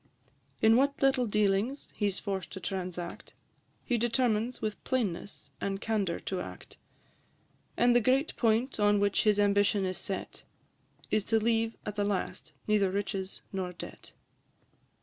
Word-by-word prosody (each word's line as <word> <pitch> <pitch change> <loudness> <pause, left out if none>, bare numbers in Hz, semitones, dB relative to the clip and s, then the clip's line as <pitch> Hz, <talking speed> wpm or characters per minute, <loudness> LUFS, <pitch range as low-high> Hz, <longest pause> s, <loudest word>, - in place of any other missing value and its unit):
In 225 +1 +7
what 280 +2 +2
little 265 -3 +3
dealings 210 +5 0
he 205 -2 +1
's 195 - -4
forced 190 -3 -4
to 190 - -5
transact, 180 -2 -5 0.5
He 240 -3 +1
determines 235 0 +1
with 215 -1 -4
plainness 205 -7 -2
and 195 0 -1
candour 205 -6 -1
to 185 -2 -3
act; - - -10 1.0
And 240 0 +4
the 245 - +6
great 265 +6 +2
point 230 +2 +1
on 205 0 +4
which 200 +1 +2
his 210 -1 +4
ambition 205 -1 +3
is 185 -1 -2
set, 195 - -5 0.7
Is 215 -1 +3
to 225 0 +3
leave 225 0 +1
at 210 0 -5
the 205 - +2
last 200 -5 -2
neither 210 -3 +3
riches 195 0 -3
nor 185 -2 -3
debt. 175 - -10
205 Hz, 150 wpm, -30 LUFS, 195-230 Hz, 1.0 s, In